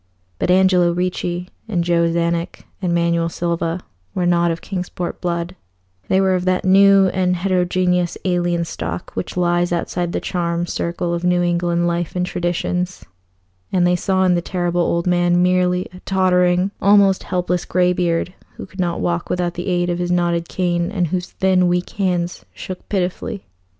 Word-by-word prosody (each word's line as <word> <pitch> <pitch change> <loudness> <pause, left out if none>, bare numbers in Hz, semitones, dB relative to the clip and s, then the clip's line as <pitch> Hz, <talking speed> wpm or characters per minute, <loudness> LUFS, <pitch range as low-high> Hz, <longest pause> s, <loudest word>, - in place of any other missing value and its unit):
But - - -1
Angelo 180 -1 +4
Ricci 180 0 -2 0.2
and 180 -6 0
Joe 170 -1 +2
Czanek 170 +1 -1 0.2
and 180 -2 0
Manuel 170 -1 +1
Silva 170 0 -2 0.3
were 180 -2 0
not 175 -1 +3
of 165 0 -2
Kingsport 180 -2 -5
blood; 175 0 -2 0.5
they 190 - +3
were 190 -1 +3
of 180 -1 -1
that 185 0 +1
new 195 0 +6
and 180 -1 +1
heterogeneous 180 -1 0
alien 175 -2 0
stock 85 - -5
which 95 - -5
lies 175 0 +1
outside 175 0 -2
the - - -1
charmed 170 -1 -2
circle 170 0 -2
of 170 0 -3
New 180 0 +2
England 175 0 +1
life 170 0 -2
and 180 0 0
traditions, 180 +1 -2 0.7
and 180 -2 +2
they 180 0 +3
saw 190 +1 +1
in 185 -1 +4
the 175 - +1
Terrible 175 -1 -1
Old 170 0 0
Man 175 0 +3
merely 180 0 +2
a 180 - -11
tottering, 180 0 +2
almost 200 -1 +5
helpless 180 -1 -1
greybeard, 180 -1 +1 0.2
who - - -7
could 190 - -16
not 175 -2 -1
walk 175 0 -1
without 175 -1 -1
the 175 +2 -5
aid 175 -1 +1
of 175 - -2
his 175 0 -2
knotted 170 -1 0
cane, 175 -1 0
and 180 -5 0
whose 180 +1 -2
thin, 185 -1 +2
weak 175 0 0
hands 180 -3 -1
shook 185 -1 -8
pitifully. 190 +1 -2
180 Hz, 170 wpm, -20 LUFS, 175-185 Hz, 0.7 s, new